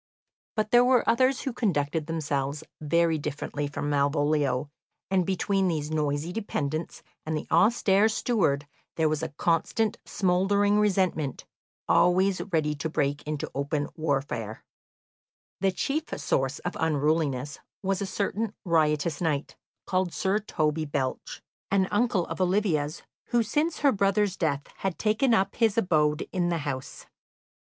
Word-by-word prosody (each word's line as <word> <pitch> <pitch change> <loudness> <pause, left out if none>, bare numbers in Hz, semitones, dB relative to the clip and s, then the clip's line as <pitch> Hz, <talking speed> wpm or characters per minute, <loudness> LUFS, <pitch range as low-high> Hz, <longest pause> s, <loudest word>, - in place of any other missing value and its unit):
But 215 -1 -1
there 240 0 +7
were 250 -1 +3
others 255 +2 +3
who 265 - -3
conducted 155 - 0
themselves 145 -3 -2 0.2
very 165 +1 +2
differently 145 0 -3
from 145 0 -4
Malvolio, 145 -1 +1 0.4
and 185 -3 +2
between 195 0 +1
these 155 -3 -2
noisy 150 +2 -1
dependents 160 -7 -3 0.2
and 155 0 -2
the - - -5
austere 210 -2 +4
steward 180 - +1 0.3
there 160 -1 +2
was 155 0 -1
a 160 - -3
constant 170 +8 0
smouldering 200 +2 +2
resentment, 185 -9 0 0.4
always 185 +2 +3
ready 155 -3 +1
to 160 +3 -3
break 145 -2 0
into 150 -1 -3
open 145 +1 -2
warfare. 135 -8 -2 1.0
The 195 -1 +2
chief 290 - -1
source 135 +2 0
of - - -5
unruliness 150 -3 0 0.2
was 195 0 0
a 200 - -2
certain 205 +2 -2
riotous 155 -2 +1
knight, 155 -4 -1 0.3
called 185 -2 0
Sir 195 +2 +1
Toby 155 -6 -1
Belch, 140 -3 -3 0.3
an 195 -1 +2
uncle 205 -5 +2
of - - -5
Olivia's, 180 -5 0 0.2
who 240 -1 +2
since 300 +9 -1
her 285 -2 +5
brother's 200 -1 +1
death 145 -4 -1
had 190 -3 -2
taken 220 +3 +2
up 195 -1 0
his 225 -3 +2
abode 155 -7 +2
in 175 -2 0
the 170 - 0
house. 130 -2 -5
165 Hz, 140 wpm, -27 LUFS, 150-200 Hz, 1.0 s, there